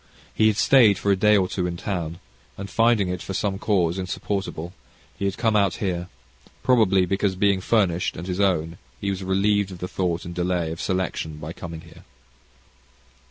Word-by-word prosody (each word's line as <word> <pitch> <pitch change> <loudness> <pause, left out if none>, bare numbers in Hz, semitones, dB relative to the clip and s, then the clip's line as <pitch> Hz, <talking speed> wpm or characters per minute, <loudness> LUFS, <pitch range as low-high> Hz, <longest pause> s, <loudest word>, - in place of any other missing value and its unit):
He 110 - +3
had 105 -2 +2
stayed 115 -5 +5
for 100 - +1
a - - +4
day 105 +2 +4
or 95 -2 +2
two 90 -1 -2
in 85 -1 -4
town, 85 -4 -3 0.4
and, 100 0 -7
finding 115 -4 +3
it 90 -2 -3
for 95 - -5
some 95 -1 -1
cause 95 -5 +1
insupportable, 90 -2 -4 0.5
had 100 -1 -1
come 115 -2 +1
out 100 -5 +3
here, 90 -3 -2 0.6
probably 100 -7 +4
because 95 +1 0
being 100 0 +2
furnished 90 -5 +1
and 85 - -6
his 90 0 -3
own, 85 -4 +1 0.2
he 100 - -1
was 95 -1 -4
relieved 100 +1 +1
of 95 - -8
the 90 - -5
thought 90 -2 -2
and 85 - -6
delay 90 -2 -1
of 80 - -6
selection, 90 -4 -2
by 75 +2 -7
coming 85 -2 -8
here. - - -16
95 Hz, 185 wpm, -24 LUFS, 85-100 Hz, 0.6 s, stayed